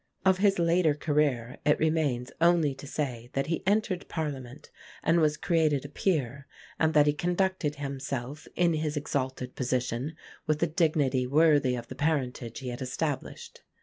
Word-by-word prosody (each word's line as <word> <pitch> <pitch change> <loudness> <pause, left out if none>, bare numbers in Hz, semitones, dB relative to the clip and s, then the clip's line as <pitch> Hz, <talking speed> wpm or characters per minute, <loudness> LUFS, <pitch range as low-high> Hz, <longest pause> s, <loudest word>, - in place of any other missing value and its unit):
Of 190 -1 +4
his 195 -1 +3
later 170 -2 +3
career 145 -6 0
it 150 - +3
remains 150 -6 0
only 170 -4 +4
to 135 +1 -11
say 125 -5 -4
that 135 - 0
he 165 0 -2
entered 205 -3 0
Parliament 145 -4 -5 0.3
and 165 +1 +3
was 150 -2 +2
created 155 -5 +1
a - - -7
Peer; 140 -7 -1 0.3
and 160 0 +2
that 150 -1 +6
he 150 - +3
conducted 175 -2 0
himself 140 0 -5
in 175 -1 +3
his 155 -1 -1
exalted 130 -3 -3
position 130 +3 -2 0.3
with 155 +1 +1
a - - +3
dignity 150 -6 +1
worthy 145 -2 +4
of 120 -1 -5
the - - -7
parentage 130 -6 -1
he 130 - -4
had 120 +2 -6
established. 135 +3 -4
150 Hz, 160 wpm, -28 LUFS, 130-160 Hz, 0.3 s, that